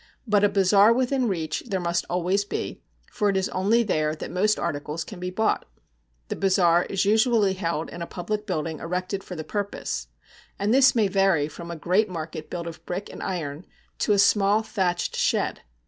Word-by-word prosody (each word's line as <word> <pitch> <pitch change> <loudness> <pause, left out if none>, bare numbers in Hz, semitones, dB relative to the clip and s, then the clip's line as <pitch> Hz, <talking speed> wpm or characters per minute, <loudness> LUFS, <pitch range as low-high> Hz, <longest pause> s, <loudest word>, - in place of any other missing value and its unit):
But 205 -3 +3
a 205 - +5
bazaar 200 +2 +5
within 255 +1 +1
reach 160 -6 -2
there 195 -4 -1
must 170 0 -1
always 180 +3 +1
be, 205 - -5 0.3
for 210 -3 +1
it 195 - +1
is 190 - 0
only 210 +6 +2
there 155 -7 0
that - - -7
most 210 +4 +2
articles 150 +3 -3
can 205 - -10
be 180 0 -3
bought. 220 +4 0 0.6
The - - -2
bazaar 180 -3 +3
is 195 0 -1
usually 215 -1 +3
held 170 -4 -3
in 175 - -8
a 170 - -4
public 210 +4 -4
building 160 -4 -2
erected 185 +3 -3
for 180 - -8
the 160 - -5
purpose, 200 - -4 0.5
and 205 +3 +1
this 270 0 +6
may 220 -3 +3
vary 195 -6 +2
from 170 +2 -9
a 170 - -4
great 185 +6 +1
market 160 -2 -6
built 170 -1 -4
of 170 -1 -8
brick 185 +3 -4
and - - -9
iron 165 -4 -4 0.3
to 210 - +2
a - - +3
small 200 +1 +4
thatched 185 -5 -1
shed. - - 0
190 Hz, 195 wpm, -25 LUFS, 170-205 Hz, 0.6 s, this